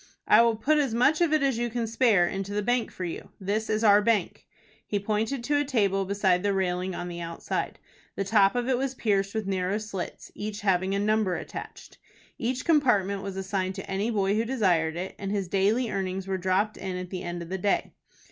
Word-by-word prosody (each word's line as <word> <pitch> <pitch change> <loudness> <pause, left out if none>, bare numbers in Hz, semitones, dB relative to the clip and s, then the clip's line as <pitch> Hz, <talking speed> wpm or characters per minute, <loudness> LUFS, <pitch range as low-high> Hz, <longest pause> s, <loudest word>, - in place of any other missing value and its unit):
"I - - +7
will 230 -1 +3
put 295 +8 +2
as 270 -6 0
much 280 +7 +3
of 340 -3 +3
it 310 -2 +3
as 265 -4 +1
you 240 0 0
can 235 0 -2
spare 225 -6 +3
into 195 +2 -4
the 210 - 0
bank 245 +2 +1
for 185 - -7
you. 170 - -6
This 210 +3 -2
is 215 +1 0
our 205 -1 +6
bank." 210 -4 0 0.4
He 205 - 0
pointed 220 +5 -1
to 290 +3 +1
a - - +2
table 200 -8 +1
beside 190 -2 +2
the 200 0 0
railing 185 -1 -1
on 175 - -4
the 175 -1 -6
outside. 170 0 -4 0.4
The 195 - -1
top 195 0 +4
of 245 0 0
it 255 -2 +1
was 265 0 -2
pierced 200 -3 0
with 220 -2 -1
narrow 190 +1 0
slits, 210 -4 -6
each 210 0 -5
having 190 -1 +1
a - - 0
number 210 -3 +1
attached. - - -8 0.4
Each 250 +2 -2
compartment 210 - +3
was 195 -1 -6
assigned 190 -1 -2
to - - -7
any 195 +4 -1
boy 200 -3 +1
who 220 - +2
desired 185 -10 +1
it, 180 +2 -4
and 195 - -4
his 200 -3 -1
daily 205 +6 +1
earnings 190 -1 -2
were 190 -1 -2
dropped 190 +4 0
in 185 -1 -4
at 180 -1 -6
the 185 -2 -4
end 175 0 -5
of 170 - -11
the 190 +1 -3
day. 200 +2 0
200 Hz, 225 wpm, -27 LUFS, 190-230 Hz, 0.4 s, I